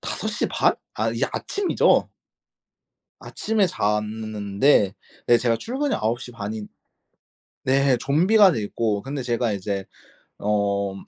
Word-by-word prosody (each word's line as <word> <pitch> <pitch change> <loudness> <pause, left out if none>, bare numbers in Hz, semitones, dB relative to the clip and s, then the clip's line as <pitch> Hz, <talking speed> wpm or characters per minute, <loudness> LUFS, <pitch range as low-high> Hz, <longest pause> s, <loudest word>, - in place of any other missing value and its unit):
5 - - -4
시 - - -1
반? - - +2 0.2
아 - - 0
이제 - - -1
아침이죠. 400 -2 +1 1.1
아침에 215 -3 0
잤는데 105 - +1 0.3
네 120 -1 +5
제가 115 -1 +1
출근이 270 - -2
9 115 +3 -1
시 125 - -8
반인 105 -1 -6 1.0
네 135 -1 +3
좀비가 185 - +4
돼 110 - -2
있고. 105 0 -1
근데 135 0 -4
제가 120 -2 0
이제 100 0 -3 0.5
어 100 -1 0
115 Hz, 205 characters per minute, -23 LUFS, 105-140 Hz, 1.1 s, 네